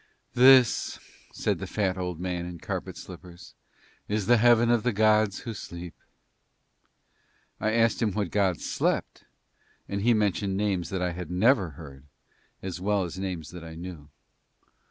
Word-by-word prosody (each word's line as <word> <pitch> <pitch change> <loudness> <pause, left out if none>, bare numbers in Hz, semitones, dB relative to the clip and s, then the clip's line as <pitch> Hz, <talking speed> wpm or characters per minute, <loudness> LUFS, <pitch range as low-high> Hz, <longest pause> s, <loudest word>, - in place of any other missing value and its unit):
"This," 130 -1 +5 0.3
said - - -1
the - - -5
fat 95 -3 -1
old 90 -3 -4
man 90 -1 -3
in 90 -1 -7
carpet - - -5
slippers, 85 -1 -12 0.5
"is 105 -1 -1
the 120 +3 +5
heaven 120 0 +5
of 120 -2 +3
the 125 - +1
gods 110 -1 +2
who 115 - -5
sleep." 85 -4 -8 1.7
I 110 0 0
asked 115 +1 +2
him 110 -3 +2
what 100 -3 -2
gods 95 -4 0
slept - - -1 0.6
and 100 0 -3
he 120 +2 +4
mentioned 100 -2 0
names 95 -5 -1
that 95 -2 -2
I 90 - 0
had 90 +1 -7
never 95 - +2
heard 70 -3 -11 0.6
as 90 -1 -5
well 100 0 +1
as 90 +1 -6
names 90 -5 -5
that 90 -1 -9
I 80 -1 -9
knew. 85 -3 -9
95 Hz, 155 wpm, -27 LUFS, 90-110 Hz, 1.7 s, This